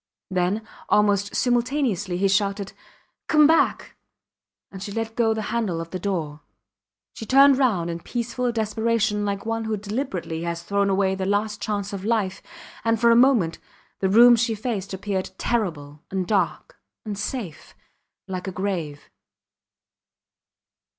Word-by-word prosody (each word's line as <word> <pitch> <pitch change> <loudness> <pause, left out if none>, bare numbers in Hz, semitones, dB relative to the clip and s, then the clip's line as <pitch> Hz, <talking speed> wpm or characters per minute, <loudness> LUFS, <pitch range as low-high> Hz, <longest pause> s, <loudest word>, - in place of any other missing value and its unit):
Then, 185 +4 0 0.2
almost 205 0 +2
simultaneously, 240 - 0
he 195 +2 +2
shouted, 200 0 0 0.5
Come 305 -1 +5
back! 320 +2 +2 0.7
and 190 - -9
she 200 - -5
let 225 +1 -4
go 230 -2 +2
the 220 -1 -2
handle 210 -8 -1
of 165 0 -7
the 185 - -4
door. 160 -6 -3 0.7
She 225 - -8
turned 275 0 +6
round 205 -11 +2
in 170 - -5
peaceful 240 +5 -2
desperation 220 -1 0
like 200 0 -3
one 225 0 -2
who 220 -1 -1
deliberately 200 -6 -4
has 170 0 -4
thrown 200 0 +1
away 190 0 +2
the 190 0 -3
last 210 +1 -1
chance 205 -1 -3
of 195 -1 -5
life; 210 -4 0 0.4
and, 225 -1 +1
for 235 0 +5
a - - +6
moment, 235 -10 +4 0.4
the 190 - +1
room 240 +4 +8
she 230 -1 0
faced 210 -3 -4
appeared 190 0 -3
terrible, 155 -11 -2
and 190 -1 -2
dark, 190 -3 -1 0.3
and 210 -1 -4
safe 205 - -6 0.5
like 185 0 -5
a - - -2
grave. 175 -6 -4
205 Hz, 145 wpm, -24 LUFS, 190-230 Hz, 0.7 s, room